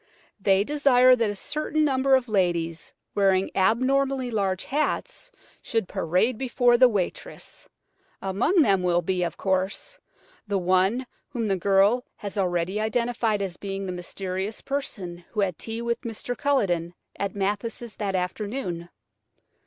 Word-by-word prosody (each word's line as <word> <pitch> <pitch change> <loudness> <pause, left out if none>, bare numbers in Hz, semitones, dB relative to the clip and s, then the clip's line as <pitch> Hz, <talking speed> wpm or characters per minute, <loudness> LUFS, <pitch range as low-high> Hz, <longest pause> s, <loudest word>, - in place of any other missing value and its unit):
They 195 0 +3
desire 255 -2 +5
that 230 -3 +1
a 205 - -3
certain 305 +6 -1
number 270 -1 +3
of 255 -1 0
ladies 170 -5 0 0.2
wearing 195 -1 +2
abnormally 255 +5 +2
large 195 -4 -1
hats 305 - -2 0.3
should 225 -5 -1
parade 190 +6 0
before 245 -2 +3
the 255 +1 +6
waitress. 195 -6 -5 0.5
Among 225 - +2
them 195 -5 +3
will 175 -1 +2
be, 185 -1 0
of 170 -3 -2
course, 190 - -2 0.5
the 200 -1 0
one 185 +7 +2 0.2
whom 240 -5 -3
the 195 -2 +1
girl 200 +6 +3
has 200 0 -7
already 185 +1 0
identified 225 -2 0
as 180 -2 -5
being 195 0 -4
the 185 - -3
mysterious 190 +3 -4
person 190 -11 -4
who 210 - 0
had 185 -4 -1
tea 225 +1 -4
with 235 0 -1
Mr. 235 +2 -5
Culledon 180 -13 0 0.2
at 200 -1 -2
Mathis' 210 +3 -3
that 200 -3 -2
afternoon. 180 -1 -3
205 Hz, 140 wpm, -25 LUFS, 185-245 Hz, 0.5 s, the